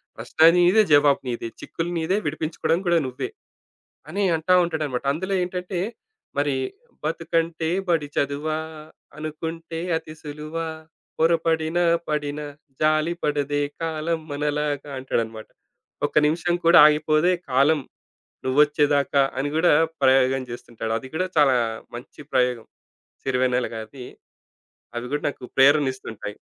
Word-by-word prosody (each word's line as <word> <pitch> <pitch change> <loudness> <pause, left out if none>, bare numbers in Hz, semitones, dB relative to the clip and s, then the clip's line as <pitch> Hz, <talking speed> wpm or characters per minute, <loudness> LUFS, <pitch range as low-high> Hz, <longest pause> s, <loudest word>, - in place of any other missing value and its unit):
ప్రశ్న 160 - +3
నీదే 180 +5 +5
జవాబు 145 -1 +5
నీదే. 120 -1 -3
చిక్కులు 165 +1 -4
నీదే 165 +4 0
విడిపించుకోవడం 155 +2 -1
కూడా 170 0 +4
నువ్వే. 130 - -5 0.8
అని 200 - -2
అంటా 160 +3 +2
ఉంటాడన్నమాట. 155 -6 -3
అందులో 185 +6 -3
ఏంటంటే 180 +1 -4 0.6
మరి, 145 -1 +1 0.5
బతుకంటే 165 -1 -1 0.2
బడి 160 -4 +1
చదువా? 145 +2 -1 0.6
అనుకుంటే 160 +2 -6 0.2
అతి 155 -1 -7
సులువ 150 +1 -8 0.6
పొరపడినా 165 +1 +2 0.2
పడినా 150 -1 -2 0.4
జాలి 155 +2 +2
పడదే 145 -1 0 0.2
కాలం 165 0 -1
మనలాగా 145 0 -2
అంటాడన్నమాట. 115 -4 -3 0.6
ఒక్క - - -13
నిమిషం 170 +3 0
కూడా 170 - +8
ఆగిపోదే 155 +3 +3 0.2
కాలం. 140 +4 +3 0.7
నువ్వొచ్చేదాకా 145 +1 +3 0.2
అని 140 +2 -1
గూడా 165 +1 +4 0.3
ప్రయోగం 135 0 +4
జేస్తుంటాడు. 115 -1 -5
అది 130 - -10
కూడా 185 +3 0
చాలా 135 -4 +5 0.4
మంచి 120 +4 -10
ప్రయోగం. 125 -3 +1 0.6
సిరివెన్నెలగారిది. 125 -1 -1 0.9
అవి 120 - -4
కూడా 145 - -1
నాకు 135 - -10
ప్రేరణిస్తుంటాయి. 130 -7 +2
150 Hz, 110 wpm, -23 LUFS, 135-160 Hz, 0.9 s, కూడా